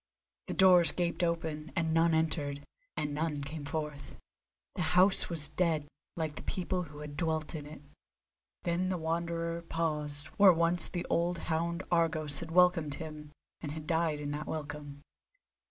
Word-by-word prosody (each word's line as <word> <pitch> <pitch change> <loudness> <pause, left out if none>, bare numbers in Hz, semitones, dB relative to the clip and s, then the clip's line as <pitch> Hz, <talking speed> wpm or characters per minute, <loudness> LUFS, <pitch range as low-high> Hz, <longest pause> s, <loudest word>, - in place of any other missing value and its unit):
The - - -3
doors 180 -3 +7
gaped 175 0 -1
open, 160 -2 -2
and 160 -2 0
none 165 0 +4
entered, 145 -3 -1 0.3
and 150 -1 -2
none 150 -1 -2
came 145 +1 -6
forth. 145 -1 -5 0.6
The - - -3 0.2
house 190 +2 +6
was 155 -3 +2
dead, 155 -2 0 0.3
like 160 -3 -3
the - - -5
people 185 0 -2
who 150 -1 -11
had 150 -1 -7
dwelt 160 -1 -1
in 150 -2 -6
it. 150 -1 -11 0.8
Then 175 +2 0
the 185 - -1
Wanderer 170 +1 -2
paused 150 -3 -3
where 200 -3 +8
once 170 +1 +2
the 175 - -4
old 170 +1 +1 0.2
hound 170 +3 -1
Argos 160 -3 +1
had 170 - -7
welcomed 170 -4 +3
him 150 -1 -8 0.3
and 150 -2 -5
had 155 -1 -7
died 160 -2 0
in 145 -1 -4
that 150 +1 -4
welcome. 145 -2 -6
160 Hz, 160 wpm, -31 LUFS, 150-170 Hz, 0.8 s, where